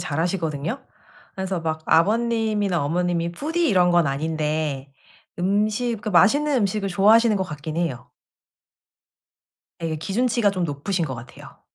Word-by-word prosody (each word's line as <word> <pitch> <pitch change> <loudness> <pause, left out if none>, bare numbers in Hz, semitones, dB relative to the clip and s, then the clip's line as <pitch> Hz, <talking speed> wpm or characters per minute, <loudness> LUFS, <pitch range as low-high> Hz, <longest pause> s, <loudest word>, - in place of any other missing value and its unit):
잘하시거든요. 165 - -2 0.5
그래서 190 -2 -3
막 160 -1 -3
아버님이나 215 -2 +2
어머님이 170 +2 -1
푸디 325 - -1
이런 180 -4 +4
건 175 -2 +3
아닌데 150 -1 -2 0.5
음식 210 +6 0
그러니까 215 - -4
맛있는 285 +10 +4
음식을 205 -2 0
좋아하시는 215 +4 +4
것 190 - -1
같긴 155 -1 -7
해요. 160 -8 -3 1.7
예 160 -1 -2
기준치가 220 +6 +1
좀 185 -3 -2
높으신 165 +4 -2
것 135 -4 -4
같아요. 115 +1 -12
180 Hz, 315 characters per minute, -23 LUFS, 160-215 Hz, 1.7 s, 이런